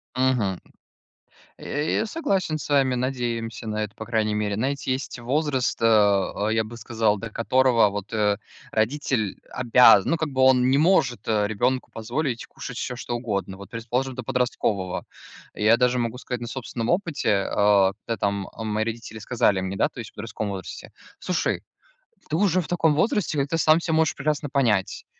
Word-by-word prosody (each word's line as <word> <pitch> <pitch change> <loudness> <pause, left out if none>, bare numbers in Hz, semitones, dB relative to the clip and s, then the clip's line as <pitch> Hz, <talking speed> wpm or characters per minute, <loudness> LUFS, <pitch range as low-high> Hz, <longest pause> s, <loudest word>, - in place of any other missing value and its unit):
Мгм. 125 -8 +1 1.0
Э, 150 +2 -2
я - - 0
согласен 195 - -1
с 150 - -7
вами, 135 -3 +3
надеемся 120 -3 -3
на 110 0 -1
это, 105 -1 -6
по 110 - -7
крайней 110 -2 0
мере. 105 -1 -1
Знаете, 130 +4 -2
есть 130 -1 -3
возраст, 135 +1 0
а,а, 105 -2 +3
я 110 0 +2
бы 115 +2 -9
сказал, 110 -2 0
до 115 - -6
которого 120 0 +3
вот, 100 0 -6
э, 105 -2 +2 0.3
родитель 110 -2 0 0.2
обяз 115 -4 +6
Ну, 165 - +1
как 160 -1 -2
бы, 130 -1 -1
он 130 -1 +5
не 135 - +4
может, 150 -7 +2
э, 105 -2 +2
ребенку 125 +5 -1
позволить 120 +3 -3
кушать 125 - -8
всё, 125 - -3
что 120 0 -4
угодно. 100 -5 -3
Вот, 100 0 -11
предположим, 120 +3 -3
до 130 - -5
подросткового. 110 -7 -1 0.5
Я 110 +2 +4
даже 125 0 +2
могу 120 0 -2
сказать 125 -1 -5
на 120 - -5
собственном 120 -2 -4
опыте, 150 - +1
а, 100 -2 +4
когда 115 - -2
там, 100 -1 -1
а, 110 - -7
мои 110 0 -1
родители 115 -1 -6
сказали 105 -3 +1
мне, 95 +1 -3
да, - - +2
то - - -12
есть - - -7
в - - -41
подростковом 105 -2 -4
возрасте: 95 -2 -8 0.3
"Слушай, 180 - -1 0.7
ты 155 - -1
уже 185 0 +2
в 160 - -8
таком 165 -3 +2
возрасте, 180 -1 +1
когда 140 0 +1
ты 165 - -1
сам 155 0 +5
всё 165 -1 -2
можешь 160 0 +2
прекрасно 150 -1 -1
понять. 115 -9 0
120 Hz, 180 wpm, -24 LUFS, 105-135 Hz, 1.0 s, обяз